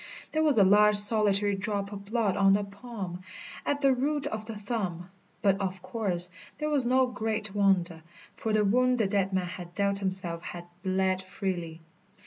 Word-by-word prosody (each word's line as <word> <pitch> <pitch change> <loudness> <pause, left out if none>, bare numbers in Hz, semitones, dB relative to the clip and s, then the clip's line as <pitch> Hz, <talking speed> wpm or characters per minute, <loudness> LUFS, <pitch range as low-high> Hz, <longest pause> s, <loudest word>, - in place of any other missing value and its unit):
There 315 - -1
was 300 -5 +2
a 205 - +6
large 210 +2 +5
solitary 205 -1 +8
drop 200 0 -4
of 200 -1 -9
blood 215 -2 -1
on 195 -1 +3
the 205 +1 +1
palm, 200 -3 -8 0.5
at 285 0 -1
the 275 -1 +3
root 285 +3 -2
of 220 0 -5
the 225 - -7
thumb; 195 -5 -5 0.3
but, 195 -1 +1
of 185 -1 -5
course, 180 -6 -3 0.3
that 300 +1 -3
was 275 -5 +1
no 260 +1 +3
great 220 -3 -4
wonder, 190 -5 0 0.3
for 220 - -4
the 215 -1 +1
wound 250 +4 +2
the 225 - +1
dead 195 -1 -1
man 185 -1 -1
had 175 -1 -10
dealt 200 -1 -1
himself 185 -3 -3
had 175 0 -9 0.2
bled 190 0 -1
freely. 180 -4 -6
200 Hz, 180 wpm, -27 LUFS, 185-220 Hz, 0.5 s, solitary